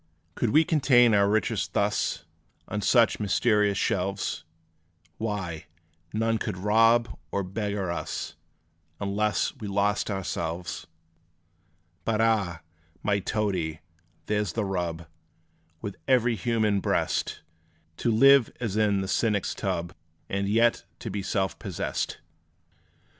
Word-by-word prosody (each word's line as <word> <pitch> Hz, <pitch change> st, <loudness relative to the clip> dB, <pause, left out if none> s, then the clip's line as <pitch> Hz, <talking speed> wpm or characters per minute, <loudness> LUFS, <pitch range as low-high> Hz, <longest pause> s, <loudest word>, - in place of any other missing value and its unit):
Could 120 Hz, -, 0 dB
we 155 Hz, +7 st, +5 dB
contain 130 Hz, -7 st, +4 dB
our 100 Hz, -1 st, +4 dB
riches 110 Hz, +1 st, +1 dB
thus, -, -, 0 dB, 0.4 s
On 105 Hz, -, -3 dB
such 115 Hz, -1 st, +4 dB
mysterious 105 Hz, -1 st, +2 dB
shelves, 95 Hz, -4 st, -1 dB, 0.8 s
Why, 95 Hz, -8 st, -3 dB, 0.4 s
none 115 Hz, +1 st, 0 dB
could 105 Hz, -4 st, -3 dB
rob 115 Hz, +3 st, +3 dB
or 100 Hz, -, -1 dB
beggar 100 Hz, -1 st, -2 dB
us; 85 Hz, -, -4 dB, 0.6 s
Unless 100 Hz, 0 st, 0 dB
we 105 Hz, -, -6 dB
lost 100 Hz, +2 st, +1 dB
ourselves! 85 Hz, -3 st, -3 dB, 1.2 s
But 110 Hz, -1 st, 0 dB
ah! 105 Hz, -7 st, +1 dB, 0.4 s
my 100 Hz, -1 st, +2 dB
Toadie, 95 Hz, -6 st, -2 dB, 0.4 s
there 105 Hz, +2 st, +1 dB
's 95 Hz, -, -5 dB
the 110 Hz, -2 st, -1 dB
rub, 85 Hz, -3 st, -3 dB, 0.8 s
With 100 Hz, -, -5 dB
every 125 Hz, -3 st, +3 dB
human 110 Hz, 0 st, +1 dB
breast -, -, -1 dB, 0.5 s
To 120 Hz, -, +1 dB
live 135 Hz, +2 st, +6 dB
as 115 Hz, -5 st, -2 dB
in 105 Hz, -2 st, +2 dB
the 95 Hz, -, -3 dB
cynic's 105 Hz, -1 st, +1 dB
tub, 85 Hz, 0 st, -3 dB, 0.3 s
And 100 Hz, 0 st, -1 dB
yet 115 Hz, +2 st, +3 dB, 0.3 s
be 100 Hz, -, -3 dB
self 95 Hz, -1 st, -1 dB
possessed! -, -, -3 dB
105 Hz, 115 wpm, -27 LUFS, 95-115 Hz, 1.2 s, live